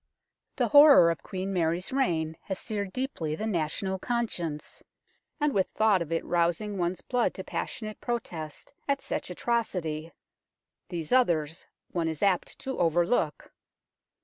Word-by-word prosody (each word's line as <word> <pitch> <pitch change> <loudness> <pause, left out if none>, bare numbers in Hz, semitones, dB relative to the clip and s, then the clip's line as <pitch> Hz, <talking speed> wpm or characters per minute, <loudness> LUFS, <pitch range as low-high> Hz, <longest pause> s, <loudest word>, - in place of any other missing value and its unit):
The - - +1
horror 285 - +8
of 165 - -5
Queen 190 +1 -4
Mary's 175 +4 0
reign 160 -12 +1
has 190 - -3
seared 200 -2 -4
deeply 185 - -3
the 215 - -4
national 190 0 -1
conscience, 180 -11 -3 0.6
and 295 -1 +2
with 190 -2 +2
thought 215 -4 +4
of 165 -1 -4
it 165 - -1
rousing 175 +4 0
one's 175 +1 -1
blood 245 -2 0
to 190 - -5
passionate 215 +5 -5
protest 170 - -5
at 280 0 +1
such - - -3
atrocity, 170 -9 -2 0.8
these 165 -4 -5
others 170 -10 +2 0.2
one 170 -2 0
is 160 +1 -3
apt 195 -3 +1
to 265 -1 -4
overlook. 170 0 +1
185 Hz, 140 wpm, -28 LUFS, 165-220 Hz, 0.8 s, horror